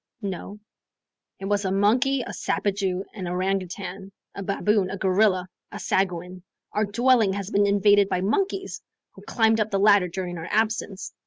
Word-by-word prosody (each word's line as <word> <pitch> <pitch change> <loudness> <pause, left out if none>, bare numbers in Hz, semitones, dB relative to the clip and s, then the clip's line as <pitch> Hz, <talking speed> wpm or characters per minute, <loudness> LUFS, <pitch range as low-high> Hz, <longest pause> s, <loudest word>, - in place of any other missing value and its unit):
"No." 200 +1 -5 0.8
"It 195 - -6
was 205 +1 0
a 190 - -1
monkey, 245 +8 +2
a - - -7
sapajou, 195 -2 -1
an 190 -4 -6
orangoutang, 190 +1 -3 0.2
a - - -7
baboon, 200 0 +1
a 195 - -4
gorilla, 190 -1 +2 0.2
a - - -7
sagoin. 180 -1 -2 0.3
Our 210 +1 +1
dwelling 230 -1 +3
has 200 +1 -5
been 205 0 +3
invaded 205 0 +4
by 185 -1 0
monkeys, 385 - -1 0.3
who - - -15
climbed 225 -1 +2
up 215 0 0
the 200 - 0
ladder 200 -2 +5
during 175 -1 -5
our 165 - -7
absence." 215 -3 -1
200 Hz, 160 wpm, -24 LUFS, 185-210 Hz, 0.8 s, ladder